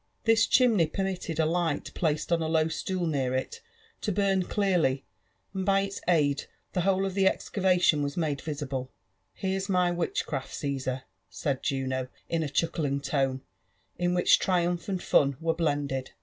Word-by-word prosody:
J\m 225 0 +5
chimney 225 -10 +4
permitted 185 -2 -3
a 160 - +4
light 170 +1 -1
placed 155 -1 -1
on 170 -1 +3
a 160 - -1
low 160 -1 +2
atool 175 +2 -2
near 135 -4 0
it 130 - -3 0.4
to 210 - -1
burn 195 -1 +2
dearly^ 175 -9 +1 0.5
and 190 -1 -2
by 195 +1 +3
its 195 0 -4
aid 150 -5 +2 0.3
the 180 - +1
whole 190 +1 +2
of 190 -1 -3
Ihe 190 - +5
excavation 180 -6 +2
waa 145 - 0
made 155 -5 0
viaiUe* 140 -4 -4 0.2
" 95 0 -47
Here'a 190 0 -1
my 180 -2 +3
witchcraft, 165 -5 -2
Caasar," 130 -2 -2 0.3
said 140 -3 -2
Juno, 130 -2 -1 0.2
in 165 -1 0
a 155 - -2
chuckling 145 -2 0
tone» 135 -2 0 0.6
io 175 - +2
which 175 - +5
triumph 175 -1 0
and 185 -2 -2
fun 140 -2 +3
were 165 0 +1
blended. 145 -5 -1
165 Hz, 165 wpm, -28 LUFS, 140-185 Hz, 0.6 s, J\m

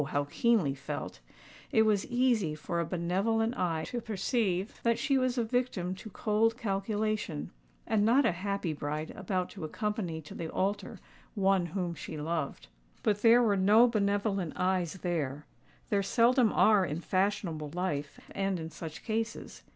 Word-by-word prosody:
how 145 -1 +1
keenly 220 -12 +2
felt,—it 135 - -4
was 210 -3 +2
easy 240 -10 +2
for 170 +3 -3
a 170 - 0
benevolent 200 +7 0
eye 165 -7 -1
to 240 - -3
perceive 205 -2 -1
that 230 -1 +2
she 275 +4 +1
was 255 -1 +1
a 240 - +2
victim 225 -6 -1
to 190 +4 -9
cold 220 +3 +1
calculation, 210 - -2 0.3
and 215 -2 +2
not 245 +6 +4
a - - +4
happy 185 -1 -2
bride 150 +2 -4
about 185 -1 -2
to 190 - -9
accompany 185 0 -3
to 150 - -11
the 165 - -5
altar 195 +4 -2 0.4
one 195 -3 +2
whom 180 0 -2
she 155 0 -7
loved. 155 -2 -3 0.4
But 205 -1 +1
there 235 +1 +6
were 210 -3 +3
no 210 +5 +6
benevolent 200 -5 0
eyes 180 -3 0
there:—there 160 +4 -3
seldom 235 +2 +3
are 210 -3 +5
in 155 -2 -2
fashionable 185 -5 -1
life 150 -6 -2
and 195 -2 -1
in 160 0 -6
such 155 0 -8
cases. 225 +1 -3
195 Hz, 150 wpm, -30 LUFS, 170-220 Hz, 0.4 s, there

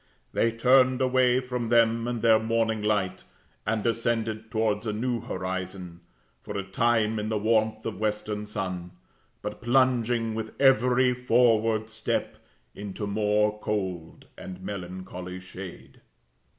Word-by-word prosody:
They 115 - +2
turned 130 +2 +4
away 130 -1 +3
from 125 -2 -3
them 115 0 +3
and 120 -2 -3
their 110 -1 +6
morning 110 -1 0
light, 105 -3 0 0.4
and 110 -1 0
descended 115 -1 -1
towards 110 -1 0
a 105 - -1
new 120 +2 -1
horizon, 95 -4 -5 0.4
for - - -6
a 100 - -2
time 110 +2 +1
in 105 +1 -3
the 110 - 0
warmth 110 0 +1
of 110 -4 -4
western 105 -1 -2
sun, 95 -4 -4 0.5
but 105 - -5
plunging 120 -2 +2
with 110 0 -6
every 125 -1 +4
forward 115 -3 +2
step 110 0 -2 0.4
into 100 0 -6
more 105 +1 +1
cold 95 -6 -4
and 90 -1 -9
melancholy 90 -1 -6
shade. 95 0 -10
110 Hz, 130 wpm, -27 LUFS, 105-120 Hz, 0.5 s, their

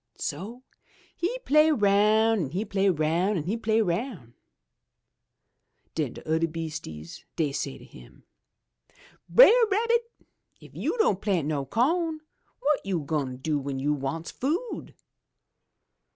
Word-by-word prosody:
So 215 - -5 0.5
he 405 +9 -2
play 305 +2 +5
roun' 215 - +3
an' - - -6
he 185 +9 -3
play 200 -1 +1
roun' 170 +4 +1
an' 155 - -2
he 190 +8 -2
play 225 -1 +1
roun'. 175 - -3 1.6
Den - - -2
de - - -12
udder 160 +1 +1
beastises 155 - -7
dey 155 -4 0
say 140 - -4
to - - -14
him, - - -16 1.1
'Brer 485 -1 +7
Rabbit, 465 +3 +1 0.5
if - - -16
you - - -2
don' 440 - +3
plant 185 -7 -1
no 145 -3 -2
co'n, 320 - +1 0.4
wot 295 0 +1
you 190 -4 -1
gwine 140 -4 -2
do 150 +3 -1
w'en 140 -1 -4
you 145 +3 0
wants 145 +4 -4
food?' 340 - -3
195 Hz, 135 wpm, -26 LUFS, -, 1.6 s, Brer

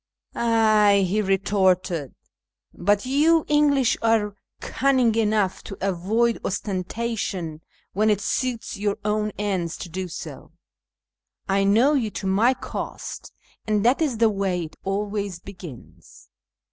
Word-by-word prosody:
" - - -46
Ay," 215 -4 +4
he 210 +4 +1
retorted, 190 -6 +1 0.3
" - - -66 0.2
but 205 +4 +1
you 305 +5 +3
English 290 -4 +3
are 220 -3 +1 0.2
cunning 260 -4 +2
enough 215 -3 +1
to 195 - -8
avoid 200 +5 0
ostentation 190 -4 -3 0.3
when 215 +3 +2
it 210 -2 +2
suits 245 +2 -2
your 205 0 -1
own 210 0 0
ends 190 -5 -2
to 175 - -7
do 185 +2 -4
so. 165 - -9 0.9
I 195 0 +2
know 230 +9 +4
you 245 -7 +1
to 195 - -5
my 215 +7 +3
cost, - - -7 0.4
and 210 0 +1
that 255 +6 +3
is 280 -8 0
the 225 0 +4
way 190 -3 -1
it 160 - -9
always 200 -1 -2
begins." 175 - -13
205 Hz, 135 wpm, -24 LUFS, 190-230 Hz, 0.9 s, Ay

